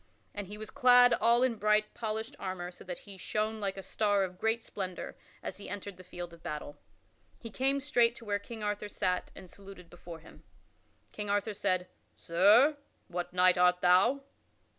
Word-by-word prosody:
And 205 -2 -6
he 205 +2 -8
was 215 0 -8
clad 245 -2 +6
all 235 +2 +3
in 245 -3 +1
bright, 210 0 +2
polished 220 +3 -4
armor 185 -2 -5
so - - -13
that 180 -1 -6
he 195 -2 -13
shone 215 +3 -2
like 195 -2 -3
a 195 - -6
star 205 -1 +1
of 180 -1 -6
great 225 +1 0
splendor 185 -3 -6 0.3
as - - -5
he 200 - -9
entered 200 -1 -7
the 185 - -12
field 175 -1 -8
of 170 - -15
battle. 150 -2 -6 0.6
He 230 - -9
came 270 +6 0
straight 245 -4 +2
to 230 - -12
where 205 -1 -1
King 220 +2 -9
Arthur 205 0 -2
sat 185 -3 -2
and 185 - -11
saluted 195 -2 -13
before 175 -1 -10
him. 160 - -16 0.7
King 210 -1 -6
Arthur 205 +1 0
said, 185 -2 0 0.3
"Sir, 210 - +4 0.3
what 175 0 -4
knight 180 0 +4
art 180 0 +4
thou?" 185 +10 +4
205 Hz, 185 wpm, -31 LUFS, 180-220 Hz, 0.7 s, clad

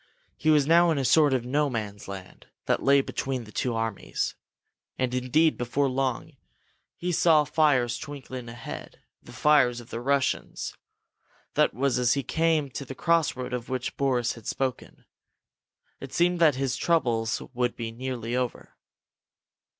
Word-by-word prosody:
He 155 - 0
was 150 -2 +5
now 170 +3 +5
in 160 - +1
a 135 - 0
sort 150 +1 +5
of 130 -2 0
No 145 +3 +1
Man's 105 -5 -5
Land 95 -1 -9 0.2
that - - +1
lay 140 0 +5
between 135 -2 -3
the 105 - -13
two 120 0 -1
armies. 115 -3 -2 0.6
And, 130 -1 -1
indeed, 130 +6 +2
before 125 +4 0
long, 130 +3 -2 0.6
he 180 +1 -3
saw 160 -2 +4
fires 140 -6 +2
twinkling 130 -4 -7
ahead 120 0 -9 0.2
the - - -14
fires 135 -5 +3
of 120 - -13
the 115 - -4
Russians. 140 +1 -1 0.8
That - - +2
was 130 0 +1
as 120 -1 +3
he 140 - -1
came 160 0 +1
to 140 - -5
the 135 0 -8
crossroad 145 -6 0
of 125 0 -4
which 130 -1 -3
Boris 125 -4 +1
had 115 -3 -12
spoken. 130 -2 -4 0.9
It - - -8
seemed 175 +1 +2
that 155 -5 +5
his 135 -1 -1
troubles 120 -9 +1
must 125 -1 0
be 115 -1 -5
nearly 120 -1 -4
over. 125 -1 -3
130 Hz, 160 wpm, -27 LUFS, 120-150 Hz, 0.9 s, was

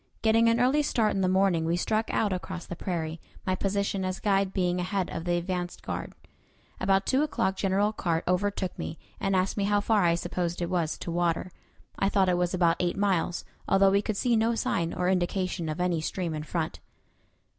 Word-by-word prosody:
Getting 225 +1 +5
an 230 +1 +2
early 260 +5 +4
start 225 -7 +1
in 195 - 0
the 185 - +2
morning, 185 -3 +3
we 165 +2 +1
struck 215 +4 0
out 205 -3 +1
across 180 0 -5
the 175 - -6
prairie, 165 -3 -3 0.2
my 185 - +1
position 195 0 -1
as 185 0 -2
guide 195 -2 +1
being 180 -2 0
ahead 185 +1 -1
of 165 - -5
the 175 0 +1
advance 175 0 -3
guard. - - -5 0.7
About 195 +1 +2
two 265 +2 +2
o'clock 190 -10 0
General 200 +2 +1
Carr 170 -5 -1
overtook 185 0 0
me, 160 - -4 0.2
and 195 0 0
asked 185 +2 +1
me 200 - +1
how 205 0 +3
far 205 -1 +2
I 170 -1 +4
supposed 175 0 -2
it 175 0 -2
was 170 -3 0
to 170 - -5
water. 175 +1 0 0.5
I 195 - +2
thought 195 -2 +3
it 180 - +2
was 180 +1 0
about 170 -2 +3
eight 175 -1 0
miles, 190 -4 0 0.2
although 195 0 +5
we 200 +1 +3
could 210 0 -3
see 240 +1 +2
no 225 +1 +2
sign 170 -6 0
or 180 - -1
indication 180 -2 0
of 155 +3 -4
any 175 -3 +1
stream 170 0 -2
in 155 - -3
front. 160 +1 -3
185 Hz, 210 wpm, -28 LUFS, 175-200 Hz, 0.7 s, Getting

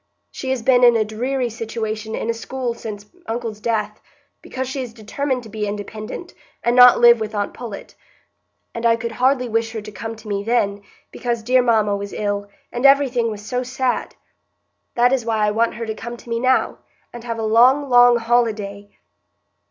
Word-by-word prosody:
She 265 - -6
has 260 -3 -1
been 250 0 +4
in 240 -1 +7
a 220 -1 +2
dreary 245 +3 -2
situation 220 -1 -4
in - - -4
a 230 - +1
school 245 +1 -4
since 210 -3 -8 0.2
uncle's 225 -2 -4
death, 210 -1 -2 0.4
because 260 0 -5
she 265 +1 -4
is 240 -3 -7
determined 255 +4 -3
to - - -11
be 215 -1 -3
independent, 215 - -6 0.3
and 240 +1 +2
not 250 0 +8
live 235 -1 +7
with 215 0 -4
aunt 205 -1 -2
Pullet; 230 -5 -8 0.8
and 230 - -6
I 230 -1 +4
could 230 0 -5
hardly 250 +2 +1
wish 225 0 -1
her 220 - -4
to 210 - -9
come 225 +3 -6
to 220 0 -14
me 200 -1 -2
then, 205 -3 0 0.3
because 235 -2 -3
dear 255 +2 +4
mamma 220 -4 +2
was 200 0 -6
ill, 205 -1 -2 0.2
and 245 - -4
everything 270 -4 +4
was 210 -1 -7
so 250 +3 -2
sad. 255 0 -2 0.8
That 245 +2 +4
is 260 -3 +1
why 220 -2 +1
I 210 - +1
want 230 +2 0
her 235 - -5
to 220 - -3
come 235 +2 -7
to 235 - -15
me 230 - 0
now, 255 +1 +1 0.3
and 240 -1 -9
have 230 -1 -4
a 225 - -3
long, 250 +6 +4
long 245 -1 +6
holiday." 220 -4 -1
230 Hz, 195 wpm, -20 LUFS, 215-245 Hz, 0.8 s, not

